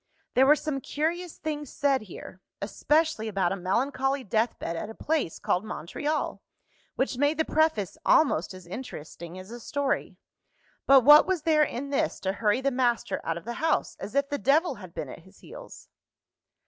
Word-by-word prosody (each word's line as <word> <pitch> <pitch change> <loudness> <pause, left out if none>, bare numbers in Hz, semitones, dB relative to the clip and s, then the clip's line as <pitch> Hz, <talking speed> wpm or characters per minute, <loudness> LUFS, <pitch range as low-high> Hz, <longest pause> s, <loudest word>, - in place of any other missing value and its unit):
There 265 +1 +5
were 300 - +7
some 295 -3 -3
curious 335 +5 -2
things 295 -3 -4
said 280 -2 +1
here 190 -1 -11 0.2
especially 295 +4 +1
about 195 -4 0
a - - 0
melancholy 260 +8 0
deathbed 215 -5 -1
at 165 - -5
a 220 - -9
place 300 - -1
called 180 - 0
Montreal 225 - -3 0.5
which 260 -2 -1
made 290 +2 +2
the 320 - +1
Preface 315 - +1
almost 240 - +3
as 185 -1 -12
interesting 170 - -8
as 185 +3 -10
a 240 - -7
story. 280 +3 -2 0.7
But 270 -1 +8
what 295 +5 +8
was 370 -5 0
there 310 -2 +3
in 280 -1 -1
this 280 - 0
to 190 0 -1
hurry 210 +4 +1
the 275 +1 +1
master 240 -4 0
out 165 0 -2
of 170 - -9
the 235 - -4
house, 320 0 +1
as 210 - -7
if 280 0 +2
the 285 -1 -2
devil 310 +6 +3
had - - -11
been - - -4
at - - -9
his - - -20
heels? - - -12
265 Hz, 180 wpm, -27 LUFS, 205-300 Hz, 0.7 s, But